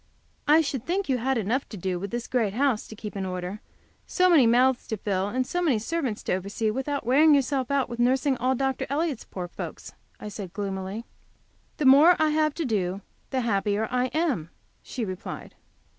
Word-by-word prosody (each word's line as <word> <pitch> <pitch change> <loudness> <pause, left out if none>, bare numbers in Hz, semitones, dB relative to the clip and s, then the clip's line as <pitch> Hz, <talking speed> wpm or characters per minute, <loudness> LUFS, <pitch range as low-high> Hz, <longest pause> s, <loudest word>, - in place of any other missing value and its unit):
"I 305 +2 +6
should 275 -6 -3
think 375 +6 -1
you 255 -2 +2
had 265 +2 0
enough 225 +5 -1
to 210 - -8
do 180 0 -2
with 200 +2 -5
this 240 +2 -4
great 220 -6 0
house 265 -4 +1
to 220 - -10
keep 210 0 -8
in 195 - -3
order, 185 +2 -4 0.5
so 365 -1 +3
many 285 -8 +6
mouths 250 +2 +3
to 220 - -3
fill, 195 -1 -1
and 255 +4 -1
so 355 +6 -2
many 300 -10 +2
servants 255 -1 -3
to - - -1
oversee, 200 +4 -1
without 270 +3 -3
wearing 295 +5 +6
yourself 270 -2 0
out 280 -1 +1
with 235 -1 -7
nursing 260 +3 +2
all 255 +2 +1
Dr. 265 0 -1
Elliott's 290 -2 -1
poor 180 -2 -6
folks," - - -8 0.3
I - - -7
said, 200 -3 -7
gloomily. 195 +2 -4 0.7
"The 300 - -1
more 290 +7 +8
I 310 0 +3
have 305 -1 +1
to 330 - -2
do 195 -5 -1 0.3
the 260 -1 -1
happier 210 -1 0
I 250 0 +1
am," 275 - -1 0.3
she 240 -4 -4
replied. 185 +1 -7
245 Hz, 200 wpm, -26 LUFS, 205-280 Hz, 0.7 s, more